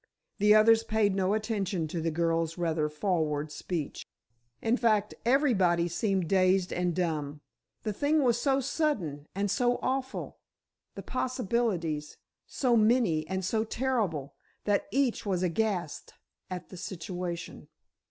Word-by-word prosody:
The 210 +1 +6
others 225 +1 +6
paid 215 -3 +1
no 195 +1 +1
attention 200 -6 -1
to 165 +1 -3
the 165 - 0
girl's 165 0 0
rather 160 -3 0
forward 150 -2 -1
speech. 160 -2 -4 0.6
In 225 +2 +1
fact, 215 -4 +2
everybody 200 - +3
seemed 185 +1 0
dazed 185 0 +3
and 180 -1 0
dumb. 155 -5 -2 0.4
The 215 - -2
thing 290 +6 +2
was 240 -2 +2
so 270 +1 +2
sudden 205 - -1
and 200 0 0
so 245 +3 +2
awful—the 265 0 -6
possibilities 215 - -1 0.3
so 250 -3 +1
many 215 -9 +3
and 190 +1 -2
so 220 +3 +1
terrible—that 205 - -2
each 270 -3 +1
was 185 -3 -1
aghast 180 -2 -2 0.3
at 180 -1 -6
the 185 - -10
situation. 175 0 -5
190 Hz, 125 wpm, -29 LUFS, 170-230 Hz, 0.6 s, The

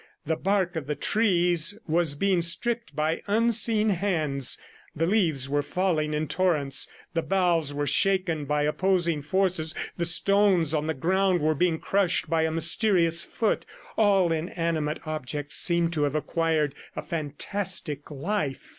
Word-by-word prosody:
The 160 +2 0
bark 190 0 0
of 155 -4 -4
the 150 - -2
trees 175 -1 +2
was 160 -2 +1
being 190 +2 +1
stripped 230 - 0
by 155 +2 -1
unseen 225 0 +3
hands; 160 -9 0 0.4
the 165 - 0
leaves 165 -9 +1
were 145 +1 0
falling 155 -2 -1
in 155 +1 -2
torrents; 150 -5 0 0.3
the 165 - 0
boughs 175 -5 +1
were 145 0 -2
shaken 185 -3 +1
by 150 +1 0
opposing 170 0 +1
forces, 170 0 0 0.2
the 170 - 0
stones 185 -2 +3
on 155 0 -1
the 160 - -1
ground 185 +5 +1
were 155 +1 +1
being 165 +1 +1
crushed 185 -1 0
by 160 -1 +2
a 160 - -1
mysterious 170 0 +2
foot. 220 - -1 0.3
All 195 -5 +3
inanimate 165 -2 -2
objects 150 -1 -3
seemed 170 -1 +2
to 155 - -1
have 145 0 -2
acquired 155 -2 0 0.2
a - - -5
fantastic 155 0 -3
life. 150 -1 -3
165 Hz, 145 wpm, -26 LUFS, 150-190 Hz, 0.4 s, unseen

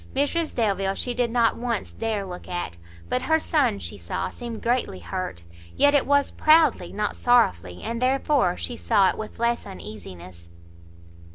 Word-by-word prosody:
Mrs 310 +4 0
Delvile 195 -4 0
she 245 - -2
did 245 -1 0
not 230 -1 +2
once 235 -4 -3
dare 220 -3 -2
look 180 -1 -8
at; 175 - -4 0.3
but 125 - 0
her 320 0 +2
son, 300 - +1
she 95 +2 -7
saw, 85 +1 -3
seemed 235 -2 -7
greatly 240 - 0
hurt; 90 - -5 0.3
yet 285 0 +5
it 285 - +3
was 285 0 +3
proudly, 310 - +4
not 210 0 -2
sorrowfully, 90 - +2
and 230 +1 -3
therefore 270 - +2
she 85 -1 -4
saw 185 - +3
it - - -9
with 215 - -7
less 235 +1 0
uneasiness. 90 - -10
220 Hz, 165 wpm, -25 LUFS, -, 0.3 s, yet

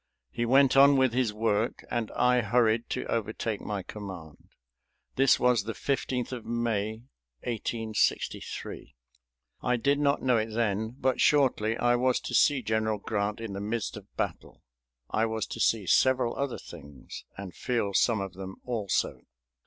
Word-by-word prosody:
He 120 0 -2
went 135 +2 +5
on 140 +1 +7
with 130 -3 +3
his 125 -3 +1
work 110 +1 -1
and 120 -3 -1
I 125 0 +3
hurried 115 +1 +2
to - - -3
overtake 110 -1 -2
my 100 -2 -4
command. 90 -7 -9 0.7
This 135 0 +4
was 125 -3 +3
the 115 - -3
15th 130 -3 -2
of 125 -3 -5
May, 115 -2 -2 0.4
1863. 110 - -2 0.7
I 125 0 +1
did 140 +4 +1
not 140 -1 +1
know 125 -2 +3
it 110 0 -2
then, 110 0 -1
but 130 -1 +1
shortly 120 -6 +3
I 120 0 +3
was 125 0 +2
to - - -6
see 140 -4 +4
General 110 0 0
Grant 105 0 -2
in 115 -3 -5
the 100 - -5
midst 110 +1 -3
of - - -10
battle. - - -4 0.5
I 110 +1 +2
was 110 0 -2
to - - -7
see 110 -4 +2
several 130 +5 +3
other 140 -3 -2
things, 70 -2 -11
and 95 -3 -7
feel 115 -5 -1
some 110 +1 +3
of 95 -2 -5
them 95 0 -8
also. 115 -6 -1
115 Hz, 160 wpm, -28 LUFS, 105-125 Hz, 0.7 s, on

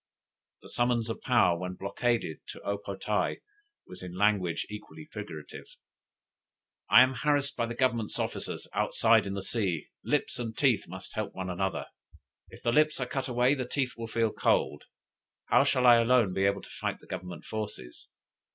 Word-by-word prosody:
The - - -12
summons 120 -2 +1
of - - -6
Paou, 105 -9 +3
when 90 0 -4
blockaded, 100 -2 -1
to - - -9
O 100 0 -2
po 100 -1 -6
tae 105 +2 -1 0.5
was 90 - -10
in 90 0 -7
language 100 -4 +2
equally 80 -7 -9
figurative: 85 -8 -8 1.2
"I 125 - +9
am 130 +1 +1
harassed 140 +2 +1
by 115 -1 -1
the 120 - -5
Government's 120 -4 0
officers - - -3
outside 110 -2 +3
in 100 - -3
the 100 - -4
sea; 95 -7 -1
lips - - 0
and 115 -2 -4
teeth 125 -8 +2
must 95 +2 -8
help 110 -2 -4
one 95 -1 -3
another, 95 +1 -2 0.6
if - - -14
the 120 - +2
lips 155 +3 +3
are 125 - 0
cut 130 +2 -3
away 125 +2 +3
the 130 -4 -3
teeth 130 -1 -1
will 115 -1 -6
feel 115 -1 +1
cold. 75 - +1 0.7
How 125 - +6
shall 130 -3 +2
I 120 -1 +9
alone 115 -4 +3
be 95 +1 +1
able 100 0 +1
to - - -12
fight - - -3
the - - -18
Government 90 -1 -7
forces? 105 - -6
110 Hz, 180 wpm, -29 LUFS, 95-125 Hz, 1.2 s, I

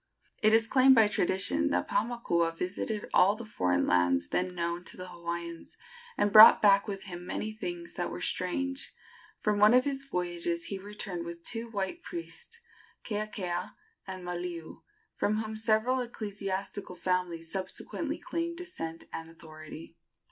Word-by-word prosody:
It 215 - +5
is 225 0 +5
claimed 265 +3 +6
by 220 -3 +6
tradition 175 - +1
that 90 0 0
Paumakua 170 -8 0
visited 205 +4 -3
all 195 +3 +5
the 235 +1 -8
foreign 90 - +1
lands 90 -1 +2
then 180 0 -1
known 170 0 -2
to - - -6
the 185 0 -7
Hawaiians, 170 -1 -6 0.4
and 205 -1 +1
brought 215 +1 +11
back 200 -1 +5
with 195 -2 -4
him 175 -3 -7
many 215 +4 -3
things 175 -5 -6
that 175 - -2
were - - -6
strange. 270 +9 -2 0.5
From 210 -1 +1
one 210 +3 +7
of 255 - +5
his 275 -1 -2
voyages 175 -6 -2
he 195 - -4
returned 195 -3 -5
with 170 0 -8
two 230 +3 -2
white 205 - -3
priests, 360 +7 -7 0.4
Keakea 205 -5 -3 0.3
and 185 -1 -6
Maliu, 175 -2 -5 0.3
from 210 - 0
whom 220 0 -3
several 220 +4 +2
ecclesiastical 200 -4 -4
families 175 -3 -2
subsequently 190 -1 -4
claimed 335 0 -3
descent 165 - -5
and 165 0 -6
authority. 155 -1 -11
190 Hz, 150 wpm, -30 LUFS, 170-220 Hz, 0.5 s, brought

